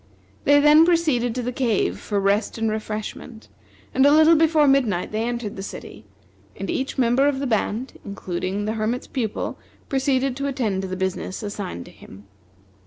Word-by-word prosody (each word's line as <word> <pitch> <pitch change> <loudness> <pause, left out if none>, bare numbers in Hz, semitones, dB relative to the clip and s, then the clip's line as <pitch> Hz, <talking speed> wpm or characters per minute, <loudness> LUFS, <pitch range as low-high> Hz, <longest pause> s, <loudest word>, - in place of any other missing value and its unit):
They 285 0 +6
then 300 +2 +7
proceeded 305 -9 +2
to 250 - -2
the 250 - -2
cave 225 - 0
for 205 - -2
rest 200 +3 0
and 225 -1 0
refreshment; 215 +1 -6 0.4
and 265 - +3
a 285 - +7
little 315 +2 +6
before 315 -1 +4
midnight 245 -10 +2
they 215 +1 -1
entered 235 -2 -3
the 195 - -6
city, 105 - -9 0.5
and 195 - -4
each 270 +1 -3
member 255 +2 +3
of 285 -2 +1
the 275 - -3
band, 230 +1 -2
including 195 0 -4
the 215 - -1
Hermit's 225 +3 -2
Pupil, 230 -6 -3 0.3
proceeded 265 -1 +1
to 280 0 -2
attend 225 -8 -1
to 190 - -4
the 185 0 -5
business 190 +1 -3
assigned 200 - -5
to - - -13
him. 95 +2 -14
235 Hz, 175 wpm, -23 LUFS, 205-270 Hz, 0.5 s, then